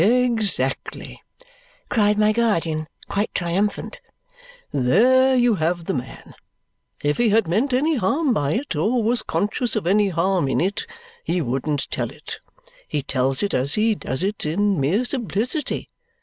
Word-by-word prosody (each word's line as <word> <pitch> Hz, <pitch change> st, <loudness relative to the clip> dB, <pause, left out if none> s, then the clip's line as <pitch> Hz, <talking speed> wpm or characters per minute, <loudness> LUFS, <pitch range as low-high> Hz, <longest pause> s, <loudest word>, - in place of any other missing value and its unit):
"Exactly!" 220 Hz, -, 0 dB, 0.7 s
cried 210 Hz, -3 st, +2 dB
my 215 Hz, 0 st, +4 dB
guardian, 165 Hz, -9 st, 0 dB, 0.2 s
quite 205 Hz, +2 st, -1 dB
triumphant. 200 Hz, -, -1 dB, 0.7 s
"There 255 Hz, -, +4 dB
you 245 Hz, -2 st, +4 dB
have 170 Hz, +1 st, 0 dB
the -, -, -1 dB
man! 130 Hz, -1 st, -7 dB, 0.7 s
If 145 Hz, 0 st, 0 dB
he 240 Hz, -2 st, +4 dB
had 220 Hz, -2 st, +3 dB
meant 225 Hz, +11 st, +1 dB
any 290 Hz, +5 st, +2 dB
harm 270 Hz, -, +1 dB
by 145 Hz, -6 st, 0 dB
it 255 Hz, -, -2 dB
or 220 Hz, +10 st, +1 dB
was 230 Hz, +1 st, +1 dB
conscious 230 Hz, +4 st, -1 dB
of 215 Hz, -, -1 dB
any 200 Hz, +3 st, +3 dB
harm 180 Hz, -2 st, +1 dB
in 135 Hz, -, 0 dB
it, 200 Hz, -, -1 dB, 0.4 s
he 180 Hz, -, -1 dB
wouldn't 135 Hz, +1 st, -2 dB
tell -, -, -2 dB
it. -, -, -9 dB, 0.5 s
He 145 Hz, -, -2 dB
tells 130 Hz, +5 st, 0 dB
it 200 Hz, -, -1 dB
as 135 Hz, +3 st, +1 dB
he 220 Hz, +1 st, +3 dB
does 170 Hz, -6 st, -3 dB
it 205 Hz, +2 st, -2 dB
in 195 Hz, +4 st, +1 dB
mere 190 Hz, -, +1 dB
simplicity. 245 Hz, -, -1 dB
205 Hz, 150 wpm, -22 LUFS, 160-235 Hz, 0.7 s, my